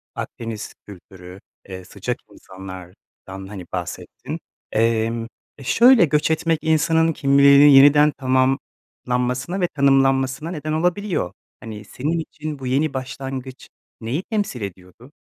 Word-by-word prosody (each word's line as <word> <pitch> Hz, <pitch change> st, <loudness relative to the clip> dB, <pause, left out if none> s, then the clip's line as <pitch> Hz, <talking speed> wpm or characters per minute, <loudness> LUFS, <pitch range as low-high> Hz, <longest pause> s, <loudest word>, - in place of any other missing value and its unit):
Akdeniz 115 Hz, -2 st, -6 dB
kültürü, 95 Hz, -1 st, -13 dB, 0.3 s
eee, 95 Hz, -1 st, -8 dB
sıcak -, -, -5 dB
insanlardan, 95 Hz, -1 st, -11 dB, 0.5 s
hani, 95 Hz, -3 st, -9 dB
bahsettin. 90 Hz, -2 st, -6 dB, 0.3 s
Emm, 115 Hz, +1 st, 0 dB, 0.3 s
e, 140 Hz, -, -12 dB
şöyle, 235 Hz, -, +6 dB
göç 150 Hz, +2 st, +1 dB
etmek 165 Hz, 0 st, 0 dB
insanın 160 Hz, +1 st, +2 dB
kimliğinin 140 Hz, 0 st, +6 dB
yeniden 145 Hz, +2 st, +7 dB
tamamlanmasına 130 Hz, +3 st, -2 dB
ve 175 Hz, -, +2 dB
tanımlanmasına 135 Hz, +1 st, +1 dB
neden 155 Hz, -2 st, -4 dB
olabiliyor. 175 Hz, -, -1 dB, 0.3 s
Hani, 110 Hz, -2 st, -9 dB
senin 150 Hz, +10 st, -3 dB
için 155 Hz, -2 st, -7 dB
bu 130 Hz, -, -6 dB
yeni 140 Hz, +2 st, 0 dB
başlangıç 130 Hz, 0 st, -7 dB, 0.3 s
neyi 130 Hz, +11 st, -3 dB
temsil 205 Hz, -, -3 dB
ediyordu? 95 Hz, +7 st, -10 dB
135 Hz, 115 wpm, -21 LUFS, 115-155 Hz, 0.5 s, yeniden